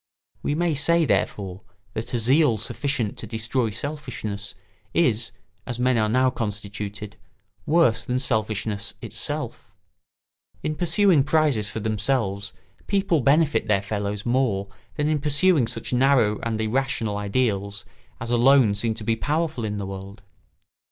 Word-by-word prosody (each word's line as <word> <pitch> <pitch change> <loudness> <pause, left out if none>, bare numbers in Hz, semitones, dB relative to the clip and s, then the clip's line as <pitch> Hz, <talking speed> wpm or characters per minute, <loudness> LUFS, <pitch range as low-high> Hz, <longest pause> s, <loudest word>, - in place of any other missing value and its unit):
We 145 - -1
may 170 0 +1
say, 165 +3 +3
therefore, 95 -8 -1 0.3
that 110 - -5
a - - +2
zeal 125 +1 +3
sufficient 120 0 -2
to 110 - -6
destroy 115 +2 -1
selfishness 115 -5 -5 0.4
is, 120 -9 +2 0.4
as 125 -2 -3
men 125 +1 +2
are 110 0 +2
now 130 +3 +3
constituted, 105 -1 -5 0.5
worse 145 -9 +3
than 125 +1 -1
selfishness 110 -4 -1
itself. - - -5 0.9
In 155 - -1
pursuing 175 -1 +3
prizes 135 -7 +2
for 110 - -5
themselves 105 -2 -1 0.4
people 195 -6 +2
benefit 145 -1 +3
their 100 -2 +2
fellows 100 0 -3
more 120 -6 +1 0.3
than 150 -1 0
in 155 -2 +1
pursuing 150 -1 +3
such - - -4
narrow 125 -5 +3
and 115 -2 -2
irrational 110 -1 0
ideals 100 -1 -1 0.3
as 115 +1 -5
alone 120 -2 +5
seem 110 +2 -1
to 110 - -7
be 115 +1 +1
powerful 150 +1 -1
in 105 -1 -2
the 100 - -3
world. 100 +1 -8
115 Hz, 140 wpm, -24 LUFS, 105-140 Hz, 0.9 s, alone